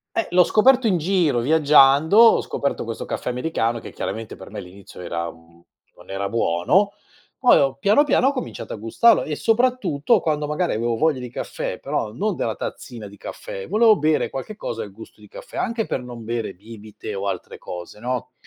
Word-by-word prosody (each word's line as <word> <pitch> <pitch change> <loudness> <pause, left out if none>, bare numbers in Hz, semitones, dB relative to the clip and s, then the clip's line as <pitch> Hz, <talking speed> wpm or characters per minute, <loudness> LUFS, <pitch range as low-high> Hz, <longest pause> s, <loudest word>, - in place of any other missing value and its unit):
Eh, 225 - 0
l'ho 180 0 +6
scoperto 250 +5 +4
in 190 -5 +2
giro, 165 -6 +1
viaggiando, 150 - +5
ho 230 0 +7
scoperto 140 - -3
questo 115 -1 -6
caffè - - -3
americano 125 -3 -1
che, - - -10
chiaramente, 110 -1 -5
per - - -12
me - - -8
all'inizio 95 +2 -11
era 85 -1 -4
mhmm, 85 +1 -22 0.3
non - - -16
era 100 +1 -2
buono, 115 - +2 0.5
poi 250 - +6
ho 135 -1 +1
piano 205 - +4
piano, 275 - +2
ho 275 - +3
cominciato 255 - -6
a - - -6
gustarlo 115 - +3
e, 155 - -3
soprattutto, 225 - +2
quando 150 -3 -1
magari 150 +4 -1
avevo 115 +1 -1
voglia 155 +1 +1
di 125 -1 -7
caffè, - - -5
però 105 - -3
non 200 - -2
della 110 - -2
tazzina 115 -4 -7
di 100 - -14
caffè, 95 0 -8
volevo 215 +2 +5
bere 155 -1 +1
qualche 135 +11 -6
cosa - - -5
al - - -9
gusto - - -13
di - - -16
caffè, - - -11
anche 230 -1 -1
per 125 - -3
non 120 -2 -9
bere 115 -2 -3
bibite 105 +1 -10
o 100 0 -4
altre 95 -3 -4
cose, 90 +3 -9
no, 125 +2 -4
135 Hz, 195 wpm, -22 LUFS, -, 0.5 s, ho